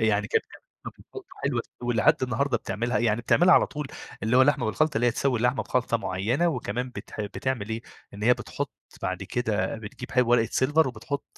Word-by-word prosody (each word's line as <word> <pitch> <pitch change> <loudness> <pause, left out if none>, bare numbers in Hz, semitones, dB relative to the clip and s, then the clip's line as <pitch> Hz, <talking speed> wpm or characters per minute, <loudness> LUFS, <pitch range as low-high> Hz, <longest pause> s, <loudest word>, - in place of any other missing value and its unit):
يعني 105 -2 +2
كانت - - +1
بتعمل - - -16 0.2
لحمة - - -6
بالخلطة - - -11 0.2
حلوة - - 0 0.2
ولحد 120 +5 +3
النهارده 130 +1 +1
بتعملها، 120 +2 -2
يعني 115 -1 +1
بتعملها 175 +9 +5
على - - +5
طول 150 -1 -5 0.4
اللي 110 +4 +2
هو 130 - +8
لحمة 140 -2 +3
بالخلطة 150 +6 +1
اللي 120 - +2
هي - - +5
تسوي 125 0 0
لحمة 125 +2 +2
بخلطة 125 -2 0
معيّنة 115 - 0
وكمان 125 -3 -3
بتح 115 - -8
بتعمل 105 +1 -3
إيه، 110 +1 -3 0.3
إن 100 - -8
هي 125 +3 +5
بتحُط - - -5 0.3
بعد - - -2
كده 110 -3 -1
بتجيب 110 +3 -1
ورقة 120 -2 +4
سيلفر 150 +3 +3
وبتحُط 125 +4 -5
120 Hz, 190 wpm, -26 LUFS, 110-130 Hz, 0.4 s, هو